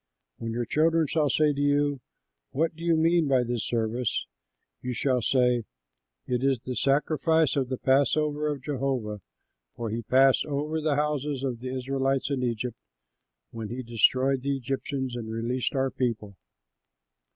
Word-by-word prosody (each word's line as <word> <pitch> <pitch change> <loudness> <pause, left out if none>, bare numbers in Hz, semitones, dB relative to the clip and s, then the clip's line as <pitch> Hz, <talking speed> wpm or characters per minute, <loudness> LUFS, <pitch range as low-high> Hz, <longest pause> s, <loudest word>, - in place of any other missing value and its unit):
"When 115 - -4
your 120 +1 -1
children 160 +4 +2
shall 150 0 +1
say 150 +2 +3
to 140 - -3
you, 145 -1 +1 0.5
'What 160 +4 +1
do 165 - -10
you 170 -1 +3
mean 165 0 +3
by 130 -2 +3
this 120 -2 -2
service?' 115 +1 -1 0.6
you 125 0 -3
shall 125 +1 +1
say, 125 -2 +2 0.6
'It 125 0 -1
is 135 -1 +3
the 130 0 -5
sacrifice 150 +3 +2
of 135 -3 0
the 130 - -2
passover 145 +3 +2
of 145 -3 -3
Jehovah, 130 -7 -2 0.5
for 115 -2 -4
he 115 +2 -2
passed 130 +3 +4
over 150 +2 -2
the 155 -2 +1
houses 145 -2 -1
of 125 -4 -2
the 130 +1 -5
Israelites 135 +1 -1
in 135 -2 0
Egypt, 120 -1 -2 0.7
when 110 -2 -6
he 125 +3 -5
destroyed 130 +3 +2
the 140 +1 -1
Egyptians 135 0 -3
and 115 -2 -5
released 120 +4 -2
our 135 0 +1
people.'" 110 -5 -2
135 Hz, 160 wpm, -27 LUFS, 120-145 Hz, 0.7 s, passed